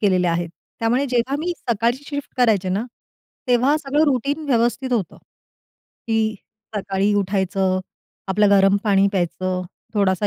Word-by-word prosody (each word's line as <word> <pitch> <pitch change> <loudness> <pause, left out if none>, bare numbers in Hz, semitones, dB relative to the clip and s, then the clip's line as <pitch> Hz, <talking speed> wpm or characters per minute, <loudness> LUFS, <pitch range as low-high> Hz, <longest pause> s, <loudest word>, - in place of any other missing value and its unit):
केलेले 185 -3 +2
आहेत, 170 0 -1 0.3
त्यामुळे 245 +5 +1
जेव्हा 250 +2 0
मी 345 +3 -1
सकाळची 235 +4 -1
शिफ्ट 285 -3 -6
करायचे 220 -7 +3
ना, 200 +5 -1 0.6
तेव्हा 255 +5 +4
सगळं 295 +1 +1
रूटीन 285 +2 0
व्यवस्थित 245 +1 +1
होतं. 215 -7 -1 0.9
की 220 -1 +1 0.4
सकाळी 195 0 0
उठायचं, 190 -1 0 0.5
आपलं 205 +2 +3
गरम 195 0 +5
पाणी 200 -1 +4
प्यायचं, 185 0 -1 0.3
थोडासा 200 0 +2
215 Hz, 130 wpm, -21 LUFS, 195-250 Hz, 0.9 s, गरम